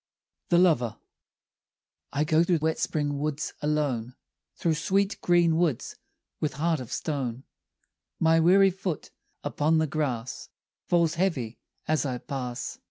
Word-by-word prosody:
THE 175 Hz, -, +4 dB
LOVER 150 Hz, -11 st, +3 dB, 1.1 s
I 145 Hz, -, +1 dB
go 155 Hz, +2 st, +3 dB
through 175 Hz, 0 st, +2 dB
wet 160 Hz, +1 st, 0 dB
spring 145 Hz, -2 st, -1 dB
woods 150 Hz, 0 st, -2 dB
alone, 140 Hz, -6 st, -1 dB, 0.4 s
Through 165 Hz, -, +1 dB
sweet 195 Hz, +6 st, 0 dB
green 170 Hz, -2 st, +4 dB
woods 165 Hz, -8 st, 0 dB, 0.4 s
with 155 Hz, -, -1 dB
heart 160 Hz, +1 st, 0 dB
of 125 Hz, -1 st, -8 dB
stone, 130 Hz, -5 st, -3 dB, 0.8 s
My 165 Hz, 0 st, +4 dB
weary 190 Hz, +4 st, +6 dB
foot 185 Hz, -3 st, -4 dB, 0.3 s
upon 155 Hz, +2 st, +1 dB
the 160 Hz, -, +3 dB
grass 135 Hz, -5 st, -3 dB, 0.4 s
Falls 170 Hz, -2 st, +3 dB
heavy 130 Hz, -12 st, -1 dB, 0.3 s
as 155 Hz, -3 st, +2 dB
I 130 Hz, -4 st, -2 dB
pass. 125 Hz, -2 st, -5 dB
155 Hz, 130 wpm, -27 LUFS, 135-170 Hz, 1.1 s, weary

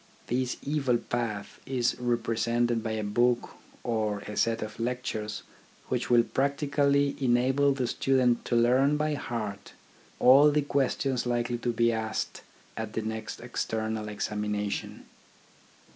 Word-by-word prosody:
This 125 Hz, +1 st, -1 dB
evil 140 Hz, -4 st, +1 dB
path 115 Hz, -4 st, -4 dB
is 125 Hz, -2 st, 0 dB
represented 120 Hz, 0 st, 0 dB
by 110 Hz, 0 st, -3 dB
a 110 Hz, -1 st, -2 dB
book 120 Hz, +4 st, +1 dB, 0.3 s
or 110 Hz, -3 st, -1 dB
a 105 Hz, -, -7 dB
set 115 Hz, +1 st, +1 dB
of 110 Hz, +1 st, -8 dB
lectures 115 Hz, -4 st, -3 dB, 0.5 s
which 125 Hz, -1 st, -1 dB
will 120 Hz, -1 st, +6 dB
practically 140 Hz, +1 st, +1 dB
enable 130 Hz, +2 st, +3 dB
the 135 Hz, -2 st, -1 dB
stu 135 Hz, +2 st, +1 dB
dent 125 Hz, -2 st, +3 dB
to 120 Hz, -, 0 dB
learn 130 Hz, +5 st, +4 dB
by 150 Hz, 0 st, 0 dB
heart 110 Hz, -8 st, -5 dB, 0.4 s
all 140 Hz, +4 st, +7 dB
the 150 Hz, 0 st, +2 dB
questions 135 Hz, -2 st, 0 dB
likely 120 Hz, 0 st, -1 dB
to 120 Hz, -, -1 dB
be 115 Hz, 0 st, +2 dB
asked 110 Hz, -1 st, -3 dB, 0.3 s
at 110 Hz, -1 st, -5 dB
the 110 Hz, -, -2 dB
next 110 Hz, 0 st, -5 dB
external 110 Hz, -2 st, -3 dB
examination. 105 Hz, -1 st, -3 dB
120 Hz, 135 wpm, -28 LUFS, 110-130 Hz, 0.5 s, all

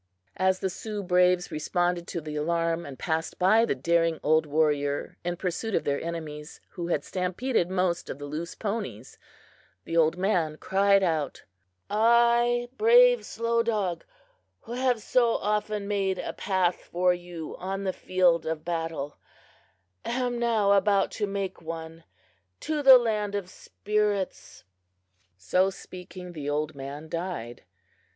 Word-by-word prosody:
As 185 Hz, 0 st, +2 dB
the 190 Hz, -, 0 dB
Sioux 210 Hz, +1 st, -5 dB
braves 180 Hz, 0 st, +3 dB
responded 175 Hz, +3 st, -1 dB
to 170 Hz, -, -4 dB
the 150 Hz, 0 st, -6 dB
alarm, 165 Hz, +2 st, -1 dB
and 135 Hz, -2 st, -9 dB
passed 160 Hz, +2 st, -2 dB
by 215 Hz, +5 st, +4 dB
the -, -, -1 dB
daring 165 Hz, +3 st, +1 dB
old 155 Hz, +1 st, +3 dB
warrior 145 Hz, -1 st, 0 dB
in 175 Hz, 0 st, -2 dB
pursuit 190 Hz, +5 st, -2 dB
of -, -, +1 dB
their 140 Hz, 0 st, -1 dB
enemies, 155 Hz, -2 st, -6 dB
who 170 Hz, -1 st, -5 dB
had 150 Hz, -4 st, 0 dB
stampeded 185 Hz, +2 st, -1 dB
most 180 Hz, -2 st, -1 dB
of -, -, -5 dB
the 145 Hz, -, -7 dB
loose 155 Hz, +4 st, -5 dB
ponies, 200 Hz, -, -5 dB, 0.7 s
the 165 Hz, -, -4 dB
old 165 Hz, 0 st, +3 dB
man 175 Hz, -5 st, 0 dB
cried 195 Hz, +2 st, +3 dB
out: 160 Hz, -6 st, -1 dB, 0.4 s
"I, 235 Hz, +2 st, +3 dB
brave -, -, +6 dB
Slow 230 Hz, 0 st, 0 dB
Dog, 210 Hz, -7 st, -1 dB, 0.6 s
who 230 Hz, -, -12 dB
have 250 Hz, -2 st, 0 dB
so 240 Hz, -2 st, +2 dB
often 210 Hz, 0 st, -1 dB
made 195 Hz, -2 st, 0 dB
a -, -, -4 dB
path 185 Hz, -3 st, 0 dB
for 180 Hz, +1 st, +1 dB
you 175 Hz, -2 st, -7 dB
on 195 Hz, +2 st, -4 dB
the 190 Hz, -1 st, -1 dB
field 180 Hz, -3 st, +2 dB
of 160 Hz, -1 st, -3 dB
battle, 165 Hz, -4 st, -3 dB, 0.9 s
am 245 Hz, 0 st, -1 dB
now 225 Hz, -4 st, +2 dB
about 200 Hz, 0 st, +3 dB
to 205 Hz, -, -2 dB
make 195 Hz, -2 st, -4 dB
one 165 Hz, 0 st, -7 dB, 0.6 s
to 310 Hz, -1 st, -1 dB
the 265 Hz, -2 st, +10 dB
land 210 Hz, -4 st, -1 dB
of 190 Hz, -3 st, -4 dB
spirits!" 205 Hz, -, -2 dB, 0.7 s
So 180 Hz, -, +2 dB
speaking, 180 Hz, -1 st, -10 dB
the 145 Hz, -3 st, -5 dB
old 150 Hz, +1 st, -1 dB
man 140 Hz, +3 st, -7 dB
died. 165 Hz, -9 st, -5 dB
180 Hz, 145 wpm, -27 LUFS, 160-210 Hz, 0.9 s, the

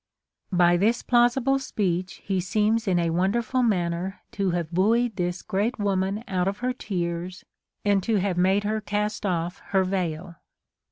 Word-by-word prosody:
By 175 Hz, -1 st, +4 dB
this 220 Hz, +6 st, +1 dB
plausible 250 Hz, +3 st, +3 dB
speech 185 Hz, -8 st, -2 dB
he 195 Hz, -2 st, 0 dB
seems 215 Hz, +4 st, +1 dB
in 185 Hz, -2 st, +2 dB
a 170 Hz, -1 st, +1 dB
wonderful 220 Hz, +9 st, +1 dB
manner 185 Hz, -3 st, -1 dB
to 200 Hz, -5 st, -1 dB
have 170 Hz, -2 st, -2 dB
buoyed 220 Hz, +5 st, +2 dB
this 180 Hz, -1 st, -2 dB
great 210 Hz, +7 st, -1 dB
woman 200 Hz, 0 st, -1 dB
out 185 Hz, -1 st, 0 dB
of 200 Hz, +1 st, -1 dB
her 250 Hz, +2 st, -1 dB
tears, 180 Hz, -5 st, -4 dB, 0.4 s
and 200 Hz, -1 st, +3 dB
to 220 Hz, +4 st, 0 dB
have 195 Hz, -2 st, +1 dB
made 190 Hz, +3 st, +2 dB
her 215 Hz, +1 st, -1 dB
cast 210 Hz, 0 st, -2 dB
off 175 Hz, 0 st, -2 dB
her 190 Hz, -1 st, +2 dB
veil. 175 Hz, -2 st, -3 dB
195 Hz, 160 wpm, -25 LUFS, 180-215 Hz, 0.4 s, By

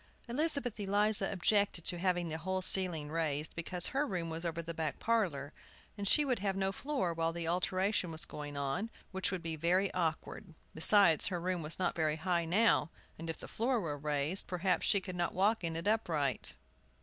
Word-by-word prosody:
Elizabeth 275 Hz, -3 st, -1 dB
Eliza 205 Hz, 0 st, +1 dB
objected 200 Hz, -2 st, +1 dB
to 175 Hz, -2 st, +1 dB
having 175 Hz, -1 st, +1 dB
the 160 Hz, 0 st, -4 dB
whole 190 Hz, +3 st, -2 dB
ceiling 170 Hz, -6 st, +5 dB
raised, 155 Hz, -2 st, -1 dB
because 175 Hz, +1 st, -3 dB
her 275 Hz, +2 st, 0 dB
room 175 Hz, -, -3 dB
was 165 Hz, +1 st, -5 dB
over 170 Hz, -1 st, -3 dB
the 170 Hz, 0 st, -4 dB
back 160 Hz, -4 st, -3 dB
parlor, 170 Hz, -12 st, 0 dB, 0.4 s
and 205 Hz, -1 st, -3 dB
she 295 Hz, +8 st, +4 dB
would 255 Hz, -5 st, 0 dB
have 195 Hz, -1 st, -1 dB
no 195 Hz, 0 st, 0 dB
floor 195 Hz, -, -2 dB
while 165 Hz, 0 st, 0 dB
the 165 Hz, 0 st, -4 dB
alteration 185 Hz, +2 st, 0 dB
was 160 Hz, 0 st, -4 dB
going 145 Hz, -1 st, -7 dB
on, 140 Hz, +11 st, -2 dB, 0.2 s
which 190 Hz, 0 st, 0 dB
would 185 Hz, -3 st, -4 dB
be 165 Hz, -1 st, -3 dB
very 180 Hz, +5 st, +1 dB
awkward. 165 Hz, +1 st, -3 dB, 0.2 s
Besides, 165 Hz, 0 st, +5 dB
her 180 Hz, -3 st, -2 dB
room 180 Hz, 0 st, -1 dB
was 155 Hz, +1 st, -4 dB
not 185 Hz, -, 0 dB
very 155 Hz, -2 st, +1 dB
high 170 Hz, +1 st, 0 dB
now, 200 Hz, +1 st, +3 dB, 0.3 s
and, 165 Hz, 0 st, -6 dB
if 165 Hz, -, -3 dB
the -, -, -8 dB
floor 240 Hz, +2 st, 0 dB
were 160 Hz, -7 st, -3 dB
raised, 150 Hz, +4 st, -1 dB
perhaps 180 Hz, -1 st, 0 dB
she 200 Hz, -, +4 dB
could 185 Hz, -1 st, -7 dB
not 175 Hz, -1 st, -1 dB
walk 205 Hz, +3 st, +2 dB
in 165 Hz, -1 st, -2 dB
it 165 Hz, +4 st, -3 dB
upright. 150 Hz, -, 0 dB
175 Hz, 195 wpm, -33 LUFS, 160-200 Hz, 0.4 s, ceiling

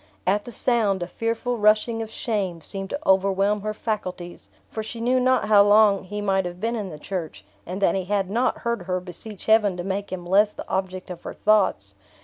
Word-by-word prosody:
At 205 Hz, +3 st, +1 dB
the 240 Hz, -, -8 dB
sound, 215 Hz, -6 st, +1 dB
a -, -, -5 dB
fearful 230 Hz, +2 st, -2 dB
rushing 215 Hz, +2 st, +3 dB
of 220 Hz, -, -5 dB
shame 200 Hz, -7 st, -2 dB
seemed 195 Hz, +3 st, -6 dB
to 285 Hz, -, -3 dB
overwhelm 195 Hz, +2 st, +3 dB
her 215 Hz, +1 st, -2 dB
faculties; 185 Hz, -5 st, -5 dB, 0.2 s
for 220 Hz, -, -5 dB
she 220 Hz, +2 st, -6 dB
knew 250 Hz, +2 st, +2 dB
not 255 Hz, -3 st, +2 dB
how 210 Hz, -2 st, +7 dB
long 205 Hz, -1 st, +5 dB
he 205 Hz, +3 st, -5 dB
might 195 Hz, -2 st, +1 dB
have 175 Hz, 0 st, -6 dB
been 230 Hz, +4 st, -1 dB
in 210 Hz, -4 st, -4 dB
the 155 Hz, -, -8 dB
church, 155 Hz, -, -6 dB, 0.2 s
and 185 Hz, +3 st, -4 dB
that 170 Hz, -, +4 dB
he 190 Hz, -2 st, -2 dB
had 200 Hz, -1 st, 0 dB
not 235 Hz, +6 st, 0 dB
heard 235 Hz, -3 st, 0 dB
her 180 Hz, 0 st, -2 dB
beseech 180 Hz, +3 st, -7 dB
Heaven 215 Hz, -4 st, +4 dB
to 175 Hz, -, -4 dB
make 195 Hz, +2 st, -3 dB
him 180 Hz, -2 st, -5 dB
less 205 Hz, +4 st, +3 dB
the -, -, -8 dB
object 185 Hz, -1 st, -3 dB
of 175 Hz, -1 st, -8 dB
her -, -, -7 dB
thoughts. 195 Hz, -, +2 dB
200 Hz, 215 wpm, -24 LUFS, 185-220 Hz, 0.2 s, how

